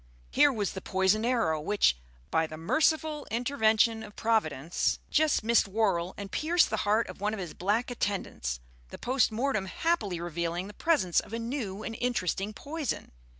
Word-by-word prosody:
Here 290 +1 +5
was 210 -6 -2
the 190 - -6
poisoned 190 +5 +1
arrow 195 -12 +1
which, 200 - +3 0.4
by 160 - +2
the 155 - -8
merciful 305 - +1
intervention 225 -2 +2
of 210 -2 -10
Providence, 170 -9 0
just 305 -6 +3
missed 230 -2 +3
Worrall 190 -4 0
and 200 -1 -7
pierced 330 -1 +2
the 220 - 0
heart 220 +2 +3
of - - -10
one 210 +1 0
of - - -7
his 175 -4 -5
black 210 +7 0
attendants, 190 - -2 0.3
the - - -8
post 255 -1 +1
mortem 220 -3 -1
happily 205 - 0
revealing 170 +1 -2
the 205 - -9
presence 280 - +2
of - - -9
a - - -1
new 230 -4 -4
and 225 - -5
interesting 205 -4 0
poison. 290 +4 -4
215 Hz, 170 wpm, -29 LUFS, 190-245 Hz, 0.4 s, Here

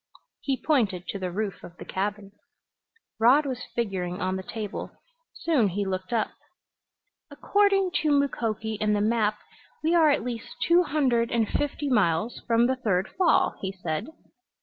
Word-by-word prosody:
He 270 -2 -2
pointed 210 - +1
to 200 - -3
the 185 -1 -2
roof 200 +2 -4
of 175 - -11
the - - -9
cabin. 200 +1 -3 0.9
Rod 260 +7 +5
was 255 -3 -4
figuring 190 -6 -2
on 185 0 -1
the 190 - -3
table. 210 +1 -5 0.5
Soon 290 -10 +2
he 200 +2 -2
looked 185 +1 -4
up. 225 -2 0 1.0
"According 390 +5 +2
to 310 - +1
Mukoki 225 -6 0
and 210 -1 +2
the - - +1
map 215 -1 +1 0.5
we 320 +2 +2
are 325 -3 +5
at 285 - +2
least 235 -2 -6
two 345 +1 +4
hundred 260 -8 +1
and 230 -2 +1
fifty 290 +3 -2
miles 210 -3 +1
from 235 0 +4
the 260 +1 +1
third 195 -7 0
fall," 360 -2 +3
he 190 - -2
said. 170 - -4
225 Hz, 160 wpm, -26 LUFS, 195-280 Hz, 1.0 s, Rod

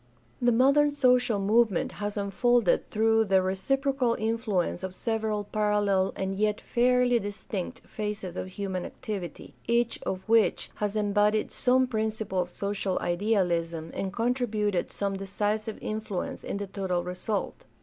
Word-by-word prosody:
The 245 0 +4
modern 275 +5 +5
social 250 -5 +3
movement 210 -1 +2
has 205 0 -4
unfolded 205 +1 +2
through 225 +1 +3
the 190 -2 +4
reciprocal 255 +6 +1
influence 220 -6 -1
of 190 -1 -5
several 220 -2 -1
parallel 205 -2 +1
and 190 0 -2
yet 210 +1 +1
fairly 245 0 +3
distinct 205 +2 -5
phases 210 -4 -4
of - - -4
human 185 -1 -4
activity, 205 -8 -6
each 235 0 +1
of 190 +1 -4
which 225 -1 +3
has 210 0 -2
embodied 210 0 +2
some 255 +1 +3
principle 220 -5 -1
of 180 0 -5
social 200 -2 -1
idealism 175 -4 0
and 195 - -3
contributed 220 -4 0
some 200 -1 -2
decisive 210 +3 -2
influence 215 -4 -4
to - - -4
the 200 0 -3
total 190 -3 -2
result. 180 +4 -3
210 Hz, 135 wpm, -28 LUFS, 195-230 Hz, -, modern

